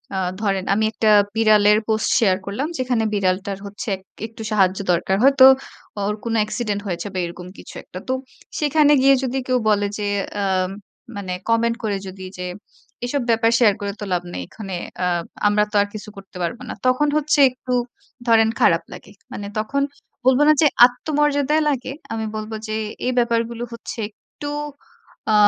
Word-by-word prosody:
আ - - -1 0.2
ধরেন 195 -3 0
আমি 215 +2 +2
একটা 215 0 +1 0.3
বিড়ালের 210 -1 +5
পোস্ট 220 0 +1
শেয়ার 190 -5 +3
করলাম। 215 +10 -2
যেখানে 250 -3 0
বিড়ালটার 195 0 0
হচ্ছে 205 +3 -7
এক 190 - -15 0.3
একটু 225 0 -12
সাহায্য 190 -2 +3
দরকার। 185 +2 +1
হয়তো 275 -1 +7 0.6
ওর 210 - -1
কোন 230 -1 -2
অ্যাক্সিডেন্ট 210 -1 -1
হয়েছে 175 +2 -3
বা 185 - -2
এরকম 175 +1 -8
কিছু - - -12
একটা। 185 - -9
তো 260 - 0 0.5
সেখানে 295 0 +4
গিয়ে 275 0 +6
যদি 260 +1 -1
কেউ 255 0 +2
বলে 205 -1 +2
যে 205 - -1 0.3
আ - - 0 0.7
মানে 185 -2 -4 0.2
কমেন্ট 230 0 +2
করে 205 -2 0
যদি 190 0 -8
যে 180 - -4 0.6
"এসব 275 +2 -1
ব্যাপার 230 0 +3
শেয়ার 215 -4 +5
করে 200 0 -2
তো - - -5
লাভ 175 0 0
নেই। 90 - -4
এখানে 195 -4 -7 0.3
আ - - +2 0.4
আমরা 210 0 +3
তো - - -7
আর 205 - 0
কিছু 210 0 -8
করতে 195 -2 -11
পারব 170 +8 -2
না।" - - -3
তখন 255 +4 +3
হচ্ছে 300 0 +1
একটু 255 0 -6 0.5
ধরেন 225 -1 +5
খারাপ - - +4
লাগে। - - -12 0.2
মানে 200 0 -5
তখন 280 +6 -1 0.4
বলব 260 +1 +5
না 305 - +7
যে 305 - +6 0.2
আত্মমর্যাদায় 295 +3 +1
লাগে। 265 -1 -2 0.2
আমি 220 -1 -2
বলব 215 +1 -5 0.2
যে 215 - -2 0.3
এই 255 - +1
ব্যাপারগুলো 235 0 0
হচ্ছে 230 - -8
একটু 290 +6 -11 0.8
আ - - +3
220 Hz, 175 wpm, -21 LUFS, 200-255 Hz, 0.8 s, হয়তো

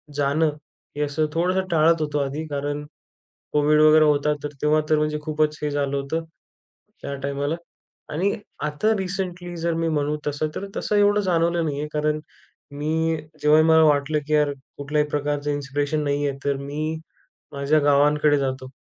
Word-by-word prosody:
जाणं 145 +2 +2 0.5
हे, - - -1
असं 150 +2 0
थोडंसं 185 +3 +1
टाळत 165 0 +4
होतो 150 -1 -1
आधी. 140 +3 -2
कारण 145 0 -3 0.7
कोविड 150 +1 +4
वगैरे 155 0 +7
होता, 150 0 +2
तर 145 - -2
तेव्हा, 150 +1 +3
तर 155 - +4
म्हणजे 150 0 0
खूपच 155 0 0
हे 150 - +1
झालं 140 -1 -1
होतं, 150 +4 -2 0.8
त्या 140 - -4
टायमाला 140 +3 -2 0.6
आणि 190 +6 +1 0.3
आता 150 +9 +1
रिसेंटली 180 -2 -4
जर 170 0 0
मी 165 0 0
म्हणू 150 -1 0
तसं 150 +1 -1
तर 200 - -4
तसं 210 - 0
एवढं 205 0 +4
जाणवलं 170 -2 +1
नाही 145 -1 -2
आहे. 150 - -3
कारण 150 0 0 0.5
मी, 160 +3 0 0.3
जेव्हाही 155 +1 +5
मला 160 0 +6
वाटलं 150 0 +2
की 155 - 0
यार, 150 -1 +3 0.3
कुठल्याही 150 +1 0
प्रकारचं 145 0 -1
इन्स्पिरेशन 145 +1 -1
नाही 145 0 0
आहे 135 - -4
तर 140 -1 +1
मी 150 +3 -3 0.6
माझ्या 140 +2 +2
गावांकडे 145 +1 +3
जातो 130 -1 -3
150 Hz, 165 wpm, -23 LUFS, 145-160 Hz, 0.8 s, वगैरे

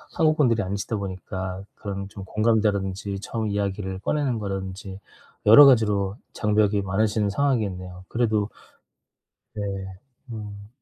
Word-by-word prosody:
한국분들이 150 - +3
아니시다 100 +4 -3
보니까 95 -1 -5
그런 100 -1 -5
좀 100 -1 -9
공감대라든지 100 -2 0
처음 110 0 -3
이야기를 100 -2 -2
꺼내는 135 -1 0
거라든지 95 -1 -5 0.5
여러 125 +7 +10
가지로 105 -5 +3 0.2
장벽이 105 -1 +2
많으신 105 +2 +1
상황이겠네요. 100 -8 -1
그래도 110 -3 +1 1.1
네. 105 - -3 0.7
음. 105 -2 -8
100 Hz, 310 characters per minute, -25 LUFS, 95-110 Hz, 1.1 s, 여러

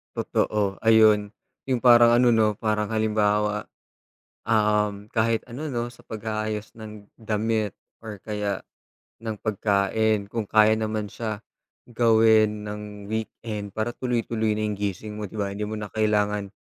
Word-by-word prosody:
Totoo. 100 -2 -1
Ayun 110 -2 +5 0.4
yung 130 -3 -1
parang 120 -1 +7
ano 120 0 +5
no 110 -2 +3
parang 105 0 -1
halimbawa, 105 -1 0 0.8
um, 105 -2 +1
kahit 115 0 +1
ano 130 +6 -6
no 120 -3 -3
sa - - -18
pag-aayos 110 -1 -4
ng 110 -2 -10 0.2
damit 110 -1 -1 0.2
or 110 -2 -7
kaya 105 -2 -3 0.6
ng 110 -2 -4
pagkain. 105 0 +1
Kung 115 +2 -3
kaya 110 +1 +4
naman 110 -1 -2
siya 110 0 -5 0.5
gawin 110 -3 +3
ng 105 -1 -8
weekend 110 -1 -5
para 110 +4 -3
tuloy-tuloy 115 -3 -1
na 105 0 -1
gising 100 +1 -4
mo 105 - -5
di 110 - -7
ba? 100 - 0
Hindi 105 - -3
mo 105 +1 -4
na 105 - -5
kailangan 105 -1 0
110 Hz, 135 wpm, -25 LUFS, 105-110 Hz, 0.8 s, parang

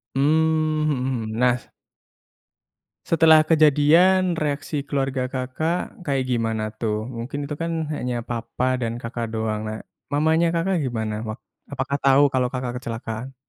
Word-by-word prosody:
Hmm, 155 +2 +2
mhm 150 - +1 0.3
mhm. 110 +1 -5
Nah, 125 0 +4
s - - -21 1.4
setelah 160 -1 +5
kejadian, 165 +4 +4
reaksi 150 -2 -2
keluarga 135 -2 -2
Kakak 140 +9 -3
kayak 140 -6 -1
gimana, 115 -3 -1
tuh? 110 -1 -2
Mungkin 130 +4 -5
itu 145 - -5
kan 165 +1 -2
hanya 125 -4 -3
papa 120 +2 -2
dan 115 0 -2
Kakak 115 -1 -5
doang. 110 -1 -2
Nah, 110 0 -7 0.2
mamanya 160 +3 +2
Kakak 170 0 0
gimana? 110 -4 -2
Wak 110 0 -5 0.3
apakah 140 0 -2
tahu 140 +1 +4
kalau 125 -1 +1
Kakak 125 -1 -4
kecelakaan? 115 +2 -6
135 Hz, 140 wpm, -23 LUFS, 115-155 Hz, 1.4 s, setelah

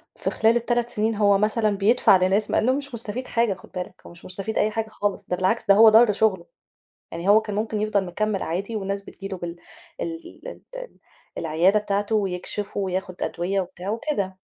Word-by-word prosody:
في - - -2
خلال 225 +1 +3
ال3 240 0 0
سنين 220 +1 0
هو 205 -1 +4
مثلًا 215 0 +1
بيدفع 210 -1 +5
لناس 190 +3 +1
مع - - +2
إنه 255 - +3
هو - - +1
مش 280 -2 -7
مستفيد 235 +2 -4
حاجة 230 -4 +1
خُد 185 - -15
بالَك، 180 0 -6
هو - - -11
مش 170 0 -14
مستفيد 195 +4 -4
أي 215 +1 +2
حاجة 225 0 -2
خالص، 205 -2 -3
ده 180 - 0
بالعكس 190 +5 0
ده 200 - +7
هو 220 +1 +8
ضَرّ 225 0 +6
شُغله. 195 -4 +1 0.7
يعني 170 +4 -3
هو 215 +2 +7
كان 210 -2 -5
مُمكن، 215 0 -2
يفضل 210 -2 +1
مكمِل 200 +3 -2
عادي 195 +7 -3
والناس 200 -1 -3
بتيجي 195 0 -9
له 195 -1 -5
بال 175 -1 -6 0.5
ال 330 -1 -3 0.3
ال - - -9
ال - - -9 0.4
العيادة 170 +6 +2
بتاعتُه 205 +1 -1
ويكشف 200 0 -2
وياخد 185 -2 -3
أدوية 190 +3 -1
وبتاع 180 +1 -7
وكده. 215 -5 -2
205 Hz, 205 wpm, -24 LUFS, 190-220 Hz, 0.7 s, هو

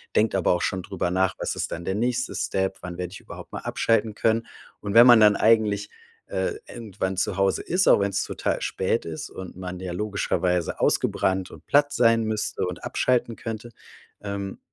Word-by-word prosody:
denkt 110 0 +3
aber 95 -2 +3
auch 90 - -1
schon 95 - -1
drüber 90 - -3
nach: 95 0 +1
„Was - - -2
ist - - -3
dann 85 - -6
der 95 - -1
nächste 125 +3 -1
Step? 95 0 -1
Wann 90 -1 -7
werde 90 -1 -4
ich 95 - -9
überhaupt - - -11
mal - - -5
abschalten 110 -1 0
können?“ 115 0 +1 0.3
Und 100 -1 -4
wenn 115 +2 +9
man 120 -2 +9
dann 105 -1 +6
eigentlich, 105 -2 +2 0.4
äh, - - -1 0.2
irgendwann 95 -4 -4
zu 95 - 0
Hause 95 0 +1
ist, 185 +2 +1
auch - - +6
wenn's 100 0 0
total - - -2
spät 95 +5 -1
ist 80 -1 -6
und 95 -1 -9
man 90 -1 -6
ja 90 -1 -4
logischerweise 90 -3 -1
ausgebrannt 95 -1 +1
und - - -14
platt 145 0 +3
sein 115 -1 +4
müsste 110 -3 -2
und 90 -1 -6
abschalten 120 -2 0
könnte, 115 +1 -6 0.5
ähm, 100 -1 -5
100 Hz, 190 wpm, -25 LUFS, 95-115 Hz, 0.5 s, wenn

